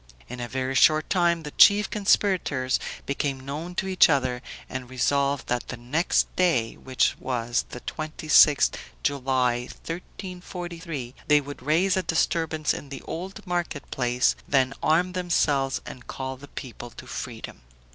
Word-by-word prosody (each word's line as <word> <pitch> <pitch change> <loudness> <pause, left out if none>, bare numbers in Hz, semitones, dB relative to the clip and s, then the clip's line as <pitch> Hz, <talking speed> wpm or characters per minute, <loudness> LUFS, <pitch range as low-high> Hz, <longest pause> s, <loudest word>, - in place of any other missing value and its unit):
In 125 - -7
a 120 - -3
very 130 +2 -2
short 155 +3 +4
time 170 -3 +2
the 150 - -6
chief 205 +5 +6
conspirators 185 -10 +1 0.3
became 140 -1 -2
known 160 +6 -5
to 190 - -1
each 185 -1 +5
other, 130 -4 +1 0.3
and 130 -1 -6
resolved 140 +2 +1
that 125 0 -2
the 130 - -6
next 135 +9 0
day, 145 -12 +2
which 130 -1 0
was 120 -2 -1
the 125 - -8
26th 155 -1 +3 0.3
July, 130 -3 +1 0.3
1343, 175 -5 -6
they 150 0 +6
would 145 -1 -8
raise 165 +7 +2
a 190 - +1
disturbance 160 -2 0
in 140 - -7
the 135 -1 -8
Old 185 +5 -6
Market 175 -5 -3
place, 125 0 +1
then 135 -1 +2
arm 175 +4 +2
themselves 145 -7 +1
and 125 - -10
call 130 0 -5
the 140 +2 -13
people 120 -3 -8
to - - -12
freedom. - - -7
145 Hz, 145 wpm, -26 LUFS, 130-170 Hz, 0.3 s, chief